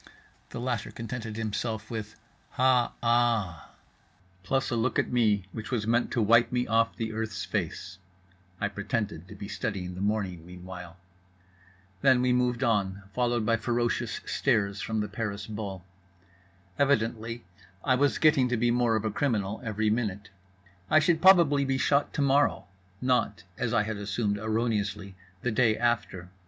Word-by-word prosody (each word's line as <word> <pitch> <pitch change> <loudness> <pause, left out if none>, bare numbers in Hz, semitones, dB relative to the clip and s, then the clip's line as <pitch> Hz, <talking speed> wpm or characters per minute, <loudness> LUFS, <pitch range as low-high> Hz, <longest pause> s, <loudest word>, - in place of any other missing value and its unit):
The - - -6
latter 120 -3 -2
contented 115 -1 -6
himself 110 +1 -3
with 110 -2 -5 0.4
"Ha 125 -1 +3
aaa"—plus 115 - -2
a - - +1
look 115 +2 0
at - - 0
me 105 -6 +2
which 110 -2 -7
was 115 -5 -1
meant 120 +2 +2
to 120 - 0
wipe 115 +3 +5
me 125 0 0
off 115 0 +2
the 110 -1 -3
earth's 110 0 -3
face 90 - -4 0.6
(I 105 - 0
pretended 100 -4 -3
to 105 - -11
be 100 0 -7
studying 95 -4 -4
the 90 - -7
morning 100 -5 -1
meanwhile). 90 0 -10 1.0
Then 130 -2 +5
we 125 -1 +3
moved 125 0 +1
on, 100 -4 0
followed 120 -2 0
by 115 0 +3
ferocious 120 0 -1
stares 100 -6 0
from 110 -1 -1
the 105 - -2
Paris 105 -1 -4
bull. 100 -4 -6 0.9
Evidently 115 -4 0 0.4
I 130 - +3
was 140 +2 +2
getting 150 -5 +4
to 125 - 0
be 120 +1 +2
more 120 -2 +2
of 110 0 -1
a 110 - 0
criminal 105 -5 -1
every 110 -1 0
minute; 105 -3 -2 0.6
I 155 - +5
should 160 +1 +3
probably 170 -7 +6
be 135 -1 0
shot 140 +2 +2
to 145 - +1
morrow, 140 -3 +2 0.4
not 125 -5 +1
(as 120 -3 -2
I 115 -2 +3
had 110 0 -4
assumed 100 0 -1
erroneously) 105 -3 -1 0.3
the 125 - 0
day 110 -1 +3
after. 110 -7 -1
115 Hz, 155 wpm, -28 LUFS, 105-125 Hz, 1.0 s, probably